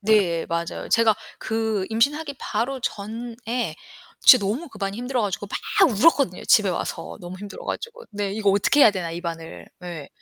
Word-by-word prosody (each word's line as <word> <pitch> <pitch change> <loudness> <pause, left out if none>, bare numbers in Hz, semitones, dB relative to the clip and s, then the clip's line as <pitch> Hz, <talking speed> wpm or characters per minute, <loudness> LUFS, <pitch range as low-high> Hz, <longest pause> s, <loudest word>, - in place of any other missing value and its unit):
네. 195 -6 +2
맞아요. 170 0 -3
제가 225 -2 +4 0.2
그 220 -3 -1
임신하기 285 +6 +1
바로 260 +2 -2
전에 235 +3 -4 0.5
진짜 250 -7 +8
너무 260 +12 -2
그 220 - -14
반이 195 0 -3
힘들어 250 +1 -2
가지고 205 0 -2 0.3
막 335 - +7
울었거든요 250 - +3
집에 205 -3 +5
와서 - - -4
너무 175 +1 -8
힘들어 205 -1 -9
가지고 470 +1 -5
네 205 -1 -3
'이거 205 -1 +2
어떻게 205 +9 +3
해야 225 - +9
되나 180 -4 -4
이 170 +1 -5
반을.' 165 -2 -7 0.2
예. 165 -5 -7
215 Hz, 355 characters per minute, -24 LUFS, 190-245 Hz, 0.5 s, 해야